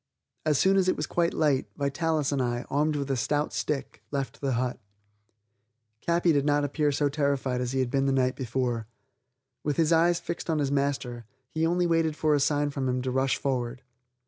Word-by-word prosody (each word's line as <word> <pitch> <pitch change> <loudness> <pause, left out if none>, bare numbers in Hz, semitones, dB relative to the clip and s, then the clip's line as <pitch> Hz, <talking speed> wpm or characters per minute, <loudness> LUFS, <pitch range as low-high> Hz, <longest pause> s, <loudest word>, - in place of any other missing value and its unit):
As 150 -2 +3
soon 195 +5 +4
as 190 -1 +3
it - - +2
was 150 - -1
quite 170 +3 +1
light, 145 -4 +1
Vitalis 150 +1 0
and 140 -2 0
I, 120 -1 -1
armed 150 +2 +1
with 140 -1 -2
a - - +2
stout 145 +4 0
stick, 140 -3 -3
left 135 -5 -4
the 135 -2 0
hut. 125 +1 -1 1.2
Capi 170 0 +3
did 140 -2 +2
not 145 0 +2
appear 145 +1 +1
so 145 +1 +1
terrified 140 -3 0
as 125 0 -2
he 135 - +1
had 125 -2 -2
been 135 0 +1
the - - +2
night 130 -1 +2
before. 120 -3 -2 0.8
With 150 -2 -1
his 165 0 +3
eyes 170 +1 +4
fixed 170 0 -5
on 160 - +2
his 140 -2 0
master, 135 -4 -1 0.3
he 160 +1 +1
only 175 +1 +1
waited 165 -2 +2
for 155 0 +2
a 145 - +3
sign 145 +1 +1
from 135 -2 -2
him 125 0 -1
to 130 - -1
rush 130 +1 +1
forward. 125 -1 -2
140 Hz, 205 wpm, -27 LUFS, 130-155 Hz, 1.2 s, soon